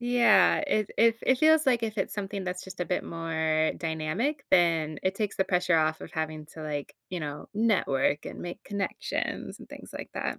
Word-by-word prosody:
Yeah, 245 0 +5
it 215 -7 0
it 230 0 +5
it 260 - +3
feels 315 0 +5
like 240 -3 +3
if 215 -2 -2
it's 195 - -1
something 200 -1 -4
that's 180 0 -4
just 190 - -10
a 180 - +1
bit 180 - -1
more 160 -1 0
dynamic. 170 - -2
Then, 165 -4 +3
it 185 +1 +1
takes 210 -1 -2
the 190 - +2
pressure 180 -2 +2
off 155 0 +1
of - - -9
having 155 -1 -3
to, 160 - -8
like, 145 -2 -4 0.2
you 180 - -3
know, 150 -1 -6
network, 165 -11 +2
and - - -7
make 175 - -7
connections, 200 -1 -3
and - - -13
things - - -11
like - - -7
that. - - -3
180 Hz, 200 wpm, -28 LUFS, 160-215 Hz, 0.2 s, Yeah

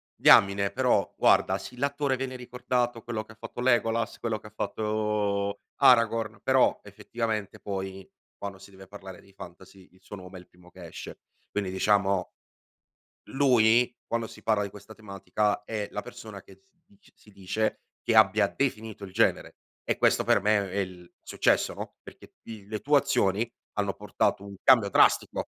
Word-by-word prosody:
diamine, 100 0 +5
però 125 -3 +1
guarda - - +3
sì, 125 - -10
l'attore 140 0 -1
viene 130 0 -4
ricordato, 125 -1 -2
quello 115 -3 -4
che 110 - -16
ha - - -15
fatto 120 - -7
Legolas, 115 -2 +1
quello 115 -2 -2
che 105 0 -13
fatto 105 -1 -2 0.2
Aragorn, 115 -4 +3
però 130 -1 +3
effettivamente 110 -4 -4
poi, 95 -1 -5 0.3
quando 100 -1 -7
si 100 - -15
deve 95 0 -14
parlare 95 -2 -11
dei 100 - -21
fantasy 95 0 -13
il 95 - -24
suo 100 - -10
nome 90 0 -11
è - - -12
il 90 - -20
primo 90 0 -20
che 90 -2 -11
esce. - - -10 0.3
Quindi 100 -2 -3
diciamo, 95 -1 +1 1.0
lui 125 -3 +4
quando 115 -1 -2
si 105 - -14
parla 110 -2 +1
di 100 - -5
questa 105 +2 -13
tematica, 105 0 -2
è 105 -2 -4
la - - -4
persona - - -10
che 95 0 -19
si 175 -2 -44
dic 200 0 -25
si 105 - -20
dice 100 +3 -2 0.2
che - - 0
abbia - - +5
definito 110 -6 -3
il 95 - -8
genere, 110 +5 0 0.3
e - - -1
questo - - +3
per 100 - +3
me 105 -1 +1
è 100 - -4
il 90 -2 -6
successo, - - +1
no, - - -8
perché - - -15
i 110 -3 -10
le 110 0 -4
tue 145 +7 +4
azioni 105 -2 0 0.2
hanno - - -1
portato 100 - -1
un 100 0 -9
cambio 120 -6 +5
drastico. - - +3
105 Hz, 170 wpm, -27 LUFS, 100-115 Hz, 1.0 s, diamine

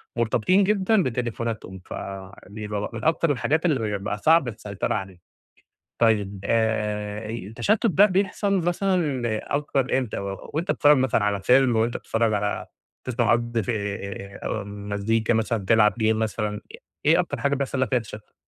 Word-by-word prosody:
مرتبطين 120 - +2
جدًا 200 0 +2
بتليفوناتهم، 115 -5 -3
فبيبقى 100 +2 -6
م - - -7
من 115 - -6
أكتر 160 0 +2
الحاجات 155 +6 0
اللي 110 -10 +1
بقى 105 +1 -3
صعب 160 +3 +4
السيطرة 105 -3 -3
عليها، 95 -3 -5 0.8
طيّب 105 -4 +2
آآ، 105 -1 -1
التشتت 115 - -1
ده 200 +2 +6
بيحصل 200 +1 0
مثلًا 175 -7 0 0.4
أكتر 135 -3 0
إمتى، 125 -5 -3
وأنت 100 - -3
بتتفرج 145 -1 +5
مثلًا 130 -4 +2
على 100 -1 0
فيلم 125 +2 +4
وأنت 115 +2 +1
بتتفرج 115 -1 0
على 105 0 -1 0.4
تسمع 120 -3 +1
قض 120 -1 0
آآ، 100 -1 -4
مزيكا 105 +3 -1
مثلًا 110 -2 -1
تلعب 105 0 +4
game 115 - -4
مثلًا 105 -1 -2 0.4
ايه 165 +4 +5
أكتر 145 -7 -2
حاجة 140 0 +1
بيحصل 135 -1 -2
لك 130 - +1
فيها 125 -2 +2
تشتُت؟ 105 -1 -11
115 Hz, 145 wpm, -24 LUFS, 105-140 Hz, 0.8 s, ده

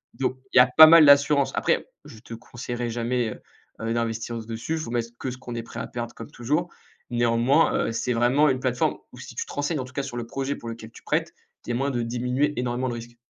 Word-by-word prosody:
Donc, 130 -1 -2 0.2
il - - +3
y - - +10
a 125 - +8
pas 160 - +13
mal 165 -1 +8
d'assurance. 140 0 +5
Après, - - 0 0.2
je 110 - -12
te 115 - -11
conseillerais 120 +1 -5
jamais, 120 0 -1
heu - - -9 0.4
heu, 115 0 -1
d'investir 115 0 -2
dessus. 115 +7 -4
Il 160 - -1
faut 135 - -6
mettre 115 -1 -2
que 130 - -4
ce 125 - -8
qu'on 125 -2 -8
est 115 - -4
prêt 115 - -9
à - - -4
perdre, 120 -1 -6
comme 115 - -10
toujours. 150 +9 -1 0.4
Néanmoins, 120 +5 +2
heu, - - -2
c'est 125 +2 -2
vraiment 130 +6 +3
une 130 -1 0
plateforme 125 -2 0 0.2
où - - -12
si - - -10
tu - - -3
te - - -10
renseignes 145 +1 -1
en 130 - -4
tout 130 - -14
cas 140 - -2
sur 120 -3 -6
le 115 -1 -5
projet 135 +2 -3
pour 115 - -10
lequel 115 -1 -9
tu - - -15
prêtes, - - -1 0.3
il - - -9
y 120 - 0
a - - -1
moyen 140 +2 0
de 120 -2 -1
diminuer 125 +5 0
énormément 125 +1 -1
le 120 - -4
risque. 120 +1 -10
120 Hz, 260 wpm, -25 LUFS, 115-135 Hz, 0.4 s, pas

